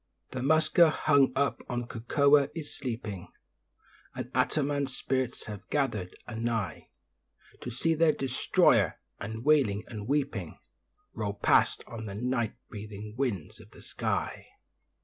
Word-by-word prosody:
The 130 Hz, -, -4 dB
'muska' 155 Hz, +4 st, +5 dB
hung 140 Hz, -3 st, +3 dB
up 140 Hz, +1 st, +1 dB
on 120 Hz, -1 st, -1 dB
the -, -, -6 dB
cocoa 140 Hz, +5 st, +3 dB
is 155 Hz, -3 st, -6 dB
sleeping, 110 Hz, -8 st, -5 dB, 0.9 s
And 125 Hz, -, -6 dB
Attanam's 140 Hz, +1 st, 0 dB
spirits 130 Hz, -2 st, -2 dB
have 105 Hz, -2 st, -8 dB
gathered 110 Hz, -11 st, -1 dB
a 120 Hz, -, -7 dB
nigh 115 Hz, -7 st, -2 dB, 0.7 s
To -, -, -6 dB
see 135 Hz, +7 st, +1 dB
their 160 Hz, 0 st, +4 dB
destroyer; 135 Hz, -3 st, +2 dB, 0.2 s
and, 110 Hz, +4 st, -6 dB
wailing 135 Hz, -10 st, +3 dB
and 105 Hz, -2 st, -7 dB
weeping, 135 Hz, -, -1 dB, 0.6 s
Roll 105 Hz, -2 st, -3 dB
past -, -, +3 dB
on 110 Hz, -1 st, -7 dB
the 100 Hz, -, -6 dB
night 120 Hz, 0 st, -1 dB
breathing 105 Hz, 0 st, -8 dB
winds 115 Hz, -, -2 dB
of -, -, -15 dB
the -, -, -15 dB
sky. -, -, -3 dB
125 Hz, 135 wpm, -29 LUFS, 110-140 Hz, 0.9 s, muska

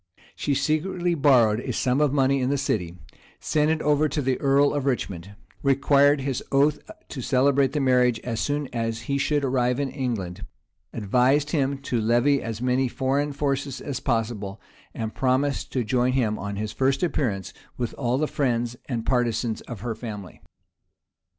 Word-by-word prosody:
She 145 Hz, -, -1 dB
secretly 175 Hz, +5 st, 0 dB
borrowed 125 Hz, -8 st, +4 dB
a 125 Hz, -, -4 dB
sum 125 Hz, +4 st, +1 dB
of 150 Hz, -3 st, +3 dB
money 135 Hz, -1 st, +2 dB
in 125 Hz, -, 0 dB
the 140 Hz, -, +1 dB
city, 90 Hz, -10 st, -2 dB, 0.4 s
sent 150 Hz, 0 st, +1 dB
it 160 Hz, 0 st, 0 dB
over 150 Hz, +1 st, +2 dB
to 145 Hz, -, -2 dB
the 130 Hz, -2 st, -1 dB
earl 140 Hz, +1 st, +3 dB
of 140 Hz, -2 st, -2 dB
Richmond, 100 Hz, -7 st, -3 dB, 0.3 s
required 140 Hz, +1 st, +4 dB
his 135 Hz, -2 st, -2 dB
oath 145 Hz, +2 st, +3 dB, 0.3 s
to 130 Hz, -, -6 dB
celebrate 135 Hz, +1 st, +2 dB
the 150 Hz, -, 0 dB
marriage 125 Hz, -3 st, +3 dB
as 115 Hz, -2 st, -3 dB
soon 145 Hz, 0 st, -1 dB
as 115 Hz, -1 st, -2 dB
he 140 Hz, 0 st, -2 dB
should 145 Hz, 0 st, +1 dB
arrive 125 Hz, -1 st, +1 dB
in 140 Hz, -2 st, -1 dB
England, 115 Hz, -10 st, -4 dB, 0.5 s
advised 125 Hz, +7 st, +2 dB
him 140 Hz, -3 st, 0 dB
to 120 Hz, -4 st, -1 dB
levy 120 Hz, +5 st, +3 dB
as 115 Hz, +1 st, -5 dB
many 130 Hz, +1 st, +2 dB
foreign 140 Hz, +3 st, -1 dB
forces 140 Hz, -1 st, -2 dB
as 140 Hz, -3 st, -4 dB
possible, 110 Hz, -5 st, -2 dB, 0.4 s
and 110 Hz, -1 st, -4 dB
promised 135 Hz, +2 st, 0 dB
to 125 Hz, -, 0 dB
join 125 Hz, +3 st, +1 dB
him 110 Hz, -5 st, 0 dB
on 100 Hz, 0 st, -4 dB
his 105 Hz, +1 st, -3 dB
first 135 Hz, -, 0 dB
appearance, 120 Hz, -, -1 dB, 0.2 s
with 120 Hz, -2 st, -3 dB
all 125 Hz, -1 st, -1 dB
the 155 Hz, +2 st, 0 dB
friends 120 Hz, -5 st, -1 dB
and 115 Hz, -3 st, -2 dB
partisans 120 Hz, -3 st, 0 dB
of 115 Hz, -5 st, -7 dB
her 115 Hz, 0 st, -2 dB
family. 105 Hz, -5 st, -8 dB
130 Hz, 170 wpm, -25 LUFS, 115-140 Hz, 0.5 s, borrowed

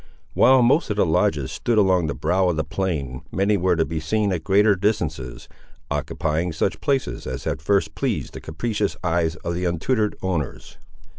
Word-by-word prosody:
While 130 Hz, +1 st, +5 dB
most 135 Hz, +6 st, +3 dB
of 105 Hz, -, -1 dB
the -, -, +4 dB
lodges 80 Hz, -, +1 dB
stood 120 Hz, -2 st, -1 dB
along 95 Hz, -5 st, +3 dB
the 70 Hz, -, -3 dB
brow 90 Hz, +7 st, +1 dB
of 85 Hz, -, -1 dB
the 80 Hz, -, +1 dB
plain, 75 Hz, -11 st, -3 dB
many 100 Hz, +2 st, +2 dB
were 90 Hz, -1 st, +2 dB
to 80 Hz, -1 st, +1 dB
be 80 Hz, -1 st, -3 dB
seen 100 Hz, +5 st, 0 dB
at 85 Hz, -3 st, -3 dB
greater 100 Hz, +2 st, +4 dB
distances, 80 Hz, -, -2 dB, 0.4 s
occupying 80 Hz, +2 st, -1 dB
such 90 Hz, +4 st, -1 dB
places 135 Hz, -2 st, -1 dB
as 65 Hz, -1 st, -5 dB
had -, -, -3 dB
first 80 Hz, -1 st, +1 dB
pleased -, -, -2 dB
the -, -, -8 dB
capricious 105 Hz, +5 st, -2 dB
eyes 85 Hz, -1 st, +1 dB
of 85 Hz, -, -4 dB
their 90 Hz, +1 st, -1 dB
untutored 105 Hz, +6 st, 0 dB
owners. 85 Hz, -7 st, -4 dB
90 Hz, 180 wpm, -23 LUFS, 80-105 Hz, 0.4 s, While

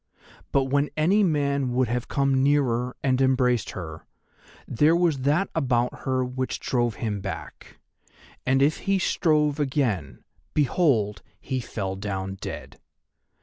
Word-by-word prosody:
But 140 Hz, -, +3 dB
when 140 Hz, +2 st, +1 dB
any 180 Hz, +7 st, +3 dB
man 140 Hz, -7 st, +1 dB
would 125 Hz, 0 st, +2 dB
have 120 Hz, +2 st, -2 dB
come 135 Hz, -2 st, +1 dB
nearer 125 Hz, -3 st, +1 dB
and 130 Hz, -1 st, +2 dB
embraced 125 Hz, -3 st, +2 dB
her, 80 Hz, -3 st, -8 dB, 0.6 s
there 150 Hz, +7 st, +3 dB
was 170 Hz, -5 st, +2 dB
that 150 Hz, +9 st, +2 dB
about 125 Hz, -5 st, 0 dB
her 130 Hz, -1 st, +1 dB
which 130 Hz, +1 st, -3 dB
drove 120 Hz, -3 st, 0 dB
him 105 Hz, -4 st, -3 dB
back, 85 Hz, -5 st, -8 dB, 0.7 s
and 135 Hz, +1 st, +3 dB
if 150 Hz, +2 st, +2 dB
he 195 Hz, -, +4 dB
strove 150 Hz, -5 st, +1 dB
again, 130 Hz, -, -1 dB, 0.3 s
behold, 125 Hz, -, +2 dB, 0.2 s
he 130 Hz, -1 st, -3 dB
fell 100 Hz, -5 st, -4 dB
down 95 Hz, -1 st, -4 dB
dead. 65 Hz, -1 st, -7 dB
130 Hz, 135 wpm, -25 LUFS, 115-145 Hz, 0.7 s, he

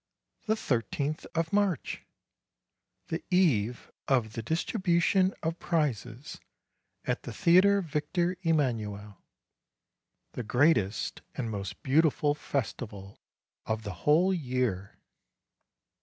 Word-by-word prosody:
The 220 Hz, -, +3 dB
thirteenth 145 Hz, -, -2 dB
of 165 Hz, +1 st, -1 dB
March! 200 Hz, -8 st, 0 dB, 1.0 s
The 165 Hz, -, -3 dB
eve 125 Hz, -, +2 dB, 0.2 s
of 120 Hz, -5 st, +1 dB
the 115 Hz, -, -4 dB
distribution 175 Hz, -, +2 dB
of 165 Hz, +1 st, -2 dB
prizes 135 Hz, -6 st, -2 dB, 0.7 s
at -, -, -1 dB
the -, -, -7 dB
Theatre 195 Hz, +3 st, +5 dB
Victor 170 Hz, +3 st, -1 dB
Emanuel, 110 Hz, -, -1 dB, 1.1 s
the -, -, -5 dB
great 130 Hz, +6 st, +4 dB
est 100 Hz, +1 st, -4 dB
and 115 Hz, -4 st, -3 dB
most 100 Hz, +4 st, -6 dB
beautiful 150 Hz, 0 st, +3 dB
festival 110 Hz, -8 st, -5 dB, 0.5 s
of 110 Hz, 0 st, -2 dB
the 100 Hz, -3 st, -5 dB, 0.2 s
whole 175 Hz, +6 st, +5 dB
year! 125 Hz, -, -2 dB
145 Hz, 100 wpm, -29 LUFS, 110-170 Hz, 1.1 s, Theatre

